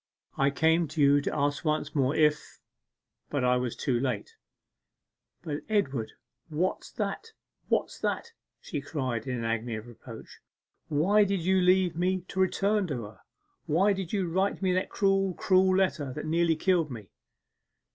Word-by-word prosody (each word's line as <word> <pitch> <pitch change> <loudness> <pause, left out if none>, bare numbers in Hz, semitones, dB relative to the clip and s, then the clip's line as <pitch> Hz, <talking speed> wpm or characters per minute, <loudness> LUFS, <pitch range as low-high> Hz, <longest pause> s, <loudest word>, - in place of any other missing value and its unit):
I 140 0 +3
came 160 +3 +2
to 155 +3 -7
you 145 0 +5
to - - -3
ask 145 0 0
once 155 -1 -1
more 135 -1 +1
if.... 150 -1 +1 0.7
But 145 -3 -1
I 125 0 +3
was 125 -2 -2
too 125 -3 0
late.' 125 -5 -3 1.1
'But, 150 -2 -3
Edward, 140 - 0 0.4
what's 165 +4 -2
that, 450 -1 -4 0.4
what's - - 0
that!' 465 - -2 0.3
she 145 - -5
cried, 130 -6 -3
in 125 -1 -2
an 115 - -4
agony 115 0 -2
of 110 0 -7
reproach. 120 -2 -12 0.5
'Why 190 +8 +3
did 200 -2 0
you 190 +2 +2
leave 180 -1 +3
me 185 +2 0
to 190 - -4
return 200 +1 +2
to 130 -7 -3
her? 105 +1 -11 0.5
Why 190 +7 +3
did 190 -3 -5
you 195 -4 0
write 190 +4 0
me 185 -1 +2
that 185 - 0
cruel, 195 -2 +1
cruel 185 -1 +3
letter 170 -8 0
that 150 - -5
nearly 165 +1 +2
killed 170 -1 +1
me! 110 -6 -9
160 Hz, 165 wpm, -28 LUFS, 135-190 Hz, 1.1 s, you